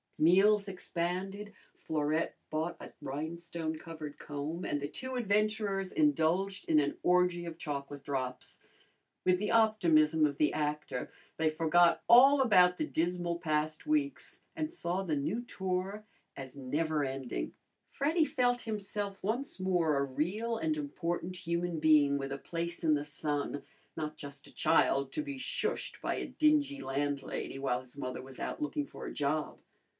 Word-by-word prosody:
Meals 200 Hz, +5 st, +5 dB
expanded, 190 Hz, +2 st, -3 dB, 0.3 s
Florette 155 Hz, +1 st, -1 dB, 0.2 s
bought 160 Hz, +2 st, -1 dB
a -, -, -9 dB
rhinestone 160 Hz, +3 st, -4 dB
covered 155 Hz, -3 st, -8 dB
comb, 150 Hz, +4 st, -4 dB
and 145 Hz, -, -1 dB
the 145 Hz, -, -3 dB
two 260 Hz, -, -5 dB
adventurers 210 Hz, -3 st, 0 dB
indulged 195 Hz, -, +2 dB
in 155 Hz, -2 st, +5 dB
an 145 Hz, -1 st, 0 dB
orgy 180 Hz, -1 st, +3 dB
of 165 Hz, -1 st, -6 dB
chocolate 145 Hz, -2 st, -5 dB
drops. 130 Hz, -2 st, -4 dB, 0.7 s
With 180 Hz, 0 st, +4 dB
the 210 Hz, -, -1 dB
optimism 165 Hz, -9 st, +4 dB
of 140 Hz, -1 st, -5 dB
the 150 Hz, -, +3 dB
actor, 150 Hz, -4 st, -2 dB, 0.3 s
they 160 Hz, -1 st, +3 dB
forgot 165 Hz, +2 st, +4 dB
all 270 Hz, +4 st, +8 dB
about 180 Hz, -7 st, +5 dB
the -, -, 0 dB
dismal 175 Hz, -, -1 dB
past 155 Hz, -, -1 dB
weeks, 300 Hz, -2 st, 0 dB
and 315 Hz, -1 st, -2 dB
saw 185 Hz, -, -2 dB
the 170 Hz, -6 st, -1 dB
new 155 Hz, +12 st, -1 dB
tour 190 Hz, -2 st, -3 dB, 0.3 s
as 135 Hz, -1 st, -8 dB
never 150 Hz, +3 st, 0 dB
ending. 130 Hz, -, -3 dB, 0.4 s
Freddy 315 Hz, +3 st, +2 dB
felt 245 Hz, -3 st, +1 dB
himself 205 Hz, -2 st, -4 dB
once 230 Hz, +4 st, -2 dB
more 175 Hz, -5 st, +2 dB
a 140 Hz, -, +2 dB
real 195 Hz, -, -1 dB
and 310 Hz, +6 st, 0 dB
important 180 Hz, -, -3 dB
human 170 Hz, -1 st, -2 dB
being 150 Hz, -2 st, +5 dB
with 135 Hz, 0 st, -4 dB
a 140 Hz, -, -3 dB
place 170 Hz, +2 st, -4 dB
in 155 Hz, -2 st, +4 dB
the 145 Hz, 0 st, 0 dB
sun, 145 Hz, -1 st, -2 dB, 0.3 s
not 155 Hz, -1 st, -4 dB
just 140 Hz, -1 st, -8 dB
a -, -, -16 dB
child 135 Hz, 0 st, +3 dB
to -, -, 0 dB
be 285 Hz, -2 st, -5 dB
shushed 260 Hz, -, -2 dB
by -, -, -1 dB
a -, -, -3 dB
dingy 295 Hz, -2 st, +2 dB
landlady 140 Hz, 0 st, -2 dB
while 135 Hz, -2 st, 0 dB
his 130 Hz, +1 st, -15 dB
mother 130 Hz, -2 st, -4 dB
was 130 Hz, 0 st, -11 dB
out -, -, -4 dB
looking 300 Hz, -1 st, -1 dB
for -, -, -9 dB
a -, -, -5 dB
job. 150 Hz, +1 st, -1 dB
170 Hz, 155 wpm, -32 LUFS, 150-205 Hz, 0.7 s, all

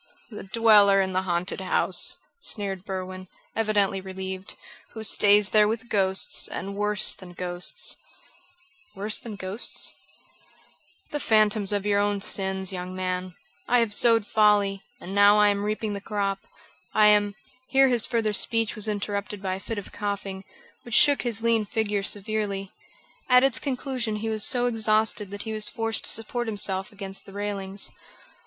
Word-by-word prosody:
"The 210 Hz, -, -8 dB
dweller 205 Hz, -1 st, +5 dB
in 190 Hz, -1 st, 0 dB
the 185 Hz, -, +1 dB
haunted 180 Hz, +1 st, -2 dB
house," 185 Hz, -, +1 dB, 0.2 s
sneered 195 Hz, -, -2 dB
Berwin, 185 Hz, -1 st, -6 dB, 0.3 s
evidently 205 Hz, -3 st, +1 dB
relieved, 190 Hz, 0 st, -7 dB, 0.4 s
"who 220 Hz, -, -7 dB
stays 205 Hz, -1 st, +4 dB
there 210 Hz, -1 st, +5 dB
with 225 Hz, +3 st, -4 dB
ghosts, 190 Hz, -2 st, +1 dB
and 195 Hz, +3 st, -6 dB
worse 210 Hz, 0 st, +2 dB
than 180 Hz, -2 st, -13 dB
ghosts." 175 Hz, 0 st, -1 dB, 1.0 s
"Worse 210 Hz, +2 st, 0 dB
than 225 Hz, -3 st, -8 dB
ghosts?" 190 Hz, +4 st, -2 dB, 1.2 s
"The 295 Hz, -, -2 dB
phantoms 215 Hz, -4 st, +2 dB
of 205 Hz, -1 st, -1 dB
my 210 Hz, -, +1 dB
own 205 Hz, 0 st, +1 dB
sins, 190 Hz, -1 st, -1 dB
young 180 Hz, 0 st, -6 dB
man. 185 Hz, -1 st, -3 dB, 0.3 s
I 245 Hz, -, +3 dB
have 230 Hz, -3 st, +2 dB
sowed 230 Hz, -1 st, +3 dB
folly, 205 Hz, -2 st, +2 dB, 0.2 s
and 190 Hz, -, -8 dB
now 205 Hz, +1 st, +6 dB
I 210 Hz, 0 st, +5 dB
am 200 Hz, 0 st, -1 dB
reaping 215 Hz, 0 st, -2 dB
the 200 Hz, -, -5 dB
crop. 200 Hz, -2 st, -3 dB, 0.5 s
I 215 Hz, -, +5 dB
am 205 Hz, -1 st, +4 dB, 0.2 s
" -, -, -31 dB
Here 270 Hz, 0 st, +4 dB
his 240 Hz, -3 st, +3 dB
further 225 Hz, -2 st, 0 dB
speech 225 Hz, +1 st, +2 dB
was 215 Hz, 0 st, 0 dB
interrupted 205 Hz, 0 st, -3 dB
by 190 Hz, -1 st, -3 dB
a 190 Hz, -, -5 dB
fit 225 Hz, +3 st, -6 dB
of 205 Hz, -, -7 dB
coughing, 200 Hz, -2 st, -4 dB, 0.4 s
which 240 Hz, -1 st, -4 dB
shook 285 Hz, -1 st, +6 dB
his 230 Hz, -3 st, 0 dB
lean 230 Hz, -1 st, +2 dB
figure 210 Hz, -1 st, -1 dB
severely. 200 Hz, -1 st, -2 dB, 0.6 s
At 250 Hz, 0 st, +6 dB
its 270 Hz, -3 st, +2 dB
conclusion 255 Hz, -4 st, -3 dB
he 220 Hz, +1 st, -3 dB
was 215 Hz, -1 st, 0 dB
so 245 Hz, -1 st, +2 dB
exhausted 215 Hz, -3 st, +1 dB
that 205 Hz, +1 st, -6 dB
he 220 Hz, -, -5 dB
was 215 Hz, -1 st, +1 dB
forced 225 Hz, -1 st, -2 dB
to -, -, +7 dB
support 240 Hz, +2 st, -2 dB
himself 195 Hz, -3 st, -1 dB
against 195 Hz, -2 st, -6 dB
the 195 Hz, -, -12 dB
railings. 200 Hz, -1 st, -3 dB
205 Hz, 165 wpm, -25 LUFS, 195-220 Hz, 1.2 s, to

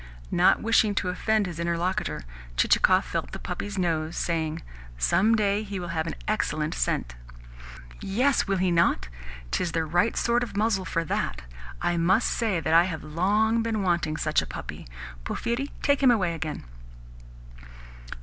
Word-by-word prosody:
Not -, -, +4 dB
wishing 220 Hz, -2 st, +3 dB
to 185 Hz, -, 0 dB
offend 215 Hz, +3 st, +1 dB
his 170 Hz, -2 st, -6 dB
interlocutor, 170 Hz, -, -1 dB, 0.3 s
Chichikov -, -, +4 dB
felt -, -, -4 dB
the -, -, -4 dB
puppy's 205 Hz, 0 st, -5 dB
nose, 165 Hz, -2 st, -1 dB
saying: 160 Hz, -1 st, -2 dB, 0.3 s
"Some 185 Hz, -, +3 dB
day 205 Hz, -1 st, +1 dB
he 200 Hz, -2 st, -5 dB
will 175 Hz, -1 st, -5 dB
have 160 Hz, -1 st, -2 dB
an -, -, -4 dB
excellent -, -, -1 dB
scent." -, -, -1 dB, 0.9 s
"Yes, 250 Hz, +8 st, +1 dB
will 195 Hz, -1 st, +1 dB
he 185 Hz, 0 st, +1 dB
not? 165 Hz, -, +2 dB, 0.4 s
'Tis 170 Hz, -3 st, -1 dB
the 165 Hz, -1 st, 0 dB
right 175 Hz, +8 st, +1 dB
sort 235 Hz, +1 st, +2 dB
of 215 Hz, -5 st, -4 dB
muzzle 205 Hz, -3 st, +1 dB
for 165 Hz, -1 st, -1 dB
that. -, -, -2 dB, 0.4 s
I 175 Hz, -, +1 dB
must 185 Hz, +7 st, +3 dB
say 220 Hz, -7 st, 0 dB
that 160 Hz, +1 st, -1 dB
I 170 Hz, +1 st, +7 dB
have 165 Hz, -4 st, -5 dB
long 210 Hz, +8 st, +1 dB
been 225 Hz, -3 st, -1 dB
wanting 170 Hz, -4 st, 0 dB
such -, -, +1 dB
a -, -, -7 dB
puppy. -, -, -8 dB, 0.4 s
Porphyri, 245 Hz, -, -2 dB
take 285 Hz, -1 st, +2 dB
him 265 Hz, -, +6 dB
away 190 Hz, -8 st, +2 dB
again." 160 Hz, -2 st, -5 dB
180 Hz, 160 wpm, -26 LUFS, 165-215 Hz, 0.9 s, I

